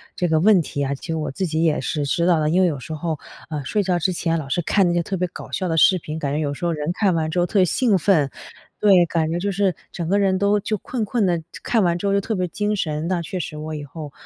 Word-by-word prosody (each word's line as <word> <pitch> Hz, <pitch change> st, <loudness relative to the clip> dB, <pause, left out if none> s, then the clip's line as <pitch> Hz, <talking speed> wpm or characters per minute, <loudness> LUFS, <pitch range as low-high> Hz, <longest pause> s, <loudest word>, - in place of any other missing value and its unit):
这 180 Hz, -, 0 dB
个 160 Hz, -1 st, +2 dB
问 195 Hz, 0 st, +5 dB
题 145 Hz, -2 st, -3 dB
啊， 140 Hz, 0 st, -1 dB
其 140 Hz, -, -8 dB
实 165 Hz, -, -2 dB
我 155 Hz, -3 st, -3 dB
自 190 Hz, +8 st, -2 dB
己 160 Hz, +1 st, 0 dB
也 155 Hz, -2 st, +2 dB
是 150 Hz, -3 st, -2 dB
知 170 Hz, +5 st, 0 dB
道 175 Hz, -2 st, +4 dB
的， 150 Hz, 0 st, +1 dB
因 180 Hz, +3 st, +3 dB
为 185 Hz, -, +4 dB
有 150 Hz, -5 st, -2 dB
时 160 Hz, +5 st, -7 dB
候， 155 Hz, 0 st, -3 dB, 0.3 s
呃， 150 Hz, -3 st, -4 dB
睡 210 Hz, -, 0 dB
觉 180 Hz, -2 st, +1 dB
之 185 Hz, +3 st, 0 dB
前 165 Hz, -1 st, 0 dB
老 145 Hz, -4 st, -5 dB
是 175 Hz, -, 0 dB
看 190 Hz, +2 st, +2 dB
那 175 Hz, -, +1 dB
些 175 Hz, -, +2 dB
特 190 Hz, +3 st, -3 dB
别 180 Hz, 0 st, 0 dB
搞 -, -, -10 dB
笑 185 Hz, -, -2 dB
的 165 Hz, -, 0 dB
视 185 Hz, +3 st, +6 dB
频， 155 Hz, -2 st, -6 dB
感 140 Hz, -3 st, -2 dB
觉 150 Hz, -, 0 dB
有 145 Hz, -2 st, -1 dB
时 160 Hz, -, -5 dB
候 170 Hz, -, +1 dB
人 150 Hz, 0 st, -2 dB
看 195 Hz, 0 st, +2 dB
完 160 Hz, -1 st, 0 dB
之 180 Hz, -, 0 dB
后 175 Hz, -, +3 dB
特 190 Hz, +1 st, +3 dB
兴 210 Hz, +3 st, +2 dB
奋， 160 Hz, -6 st, +2 dB, 0.5 s
对， 190 Hz, -4 st, +5 dB
感 165 Hz, -2 st, 0 dB
觉 170 Hz, -, -1 dB
就 200 Hz, +3 st, -1 dB
是 195 Hz, -2 st, +1 dB, 0.2 s
整 170 Hz, -2 st, -4 dB
个 195 Hz, +4 st, +2 dB
人 190 Hz, -2 st, +2 dB
都 200 Hz, +1 st, +2 dB
就 215 Hz, +2 st, -2 dB
困 235 Hz, +4 st, -4 dB
困 220 Hz, 0 st, 0 dB
的， 175 Hz, -3 st, +1 dB, 0.2 s
看 225 Hz, -4 st, +2 dB
完 175 Hz, -1 st, +2 dB
之 190 Hz, -, -5 dB
后 195 Hz, -, +2 dB
就 200 Hz, -, +2 dB
特 220 Hz, -, -3 dB
别 180 Hz, -1 st, -1 dB
精 210 Hz, +4 st, -1 dB
神。 155 Hz, -4 st, -2 dB
那 180 Hz, -1 st, 0 dB
确 180 Hz, +2 st, -5 dB
实 155 Hz, -2 st, -5 dB
我 155 Hz, +1 st, -5 dB
以 150 Hz, -, -5 dB
后 145 Hz, +1 st, -8 dB
175 Hz, 330 characters per minute, -22 LUFS, 155-190 Hz, 0.5 s, 视